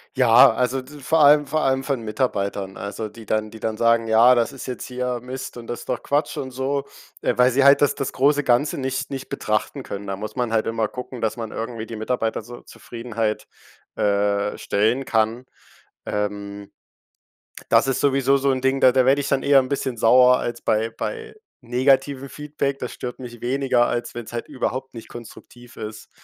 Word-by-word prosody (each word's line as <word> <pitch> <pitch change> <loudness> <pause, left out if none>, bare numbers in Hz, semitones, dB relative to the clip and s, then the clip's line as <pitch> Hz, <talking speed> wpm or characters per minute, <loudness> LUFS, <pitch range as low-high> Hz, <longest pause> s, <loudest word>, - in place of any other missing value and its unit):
Ja, 125 -2 +7
also 125 +2 0
d 145 +3 -13
vor 160 +5 +1
allem 150 0 +6
vor 155 +2 0
allem 135 -1 +1
von 135 -3 -2
Mitarbeitern, 100 -4 -2
also 105 +2 -5
die 110 +1 -13
dann 110 0 -1
die 110 - -11
dann 110 0 -3
sagen: 115 0 +3
„Ja, 115 +3 +6
das 120 -1 +1
ist 135 - -8
jetzt 125 - -5
hier 125 -1 -3
Mist 130 +1 -7
und 115 -1 -9
das 120 - -6
doch - - -3
Quatsch“ 145 +2 -1
und 130 - -4
so. 135 +2 -2 0.4
Ah, - - +2
weil 125 +1 +5
sie 135 +2 +3
halt 140 +1 +6
das 145 - +4
das 135 - -3
große 145 +2 +2
Ganze 125 +4 +2
nicht 130 0 -3
nicht 135 -1 -6
betrachten 110 +6 -2
können. 100 -2 -7
Da 95 - -2
muss 105 +2 -7
man 125 -3 -1
halt 110 -1 +2
immer 115 -1 0
gucken, 125 0 -8
dass 110 +1 -1
man 115 -2 -5
irgendwie 115 -1 -5
die 115 - -8
Mitarbeiter 110 0 -2
zur 120 +2 -12
Zufriedenheit, 115 -2 -4 0.5
äh, 100 0 0
stellen 115 +7 0
kann. 115 +2 0 0.6
Ähm, 100 -1 -4 1.0
das - - +4
ist 135 - 0
sowieso 135 -1 +3
so 140 0 +1
'n 130 -1 0
Ding, 135 +1 +1
da 130 - +6
da 130 0 +3
werde 140 +2 +4
ich 140 - -3
dann 140 - +1
eher 140 -1 +5
'n 130 - -4
bisschen 135 -3 -2
sauer 125 +3 +5
als 120 0 -4
bei 110 +1 +1
bei 445 - -6 0.3
negativem 135 +2 +1
Feedback. 145 -2 -3
Das 125 - -5
stört 125 -1 -7
mich 120 -2 -9
weniger, 130 -1 +2
als 120 0 -3
wenn's 120 -1 -7
halt 120 - -4
überhaupt 130 +1 -3
nicht 115 - -10
konstruktiv 120 +1 -13
ist, 105 0 -8
125 Hz, 200 wpm, -22 LUFS, 110-135 Hz, 1.0 s, Ja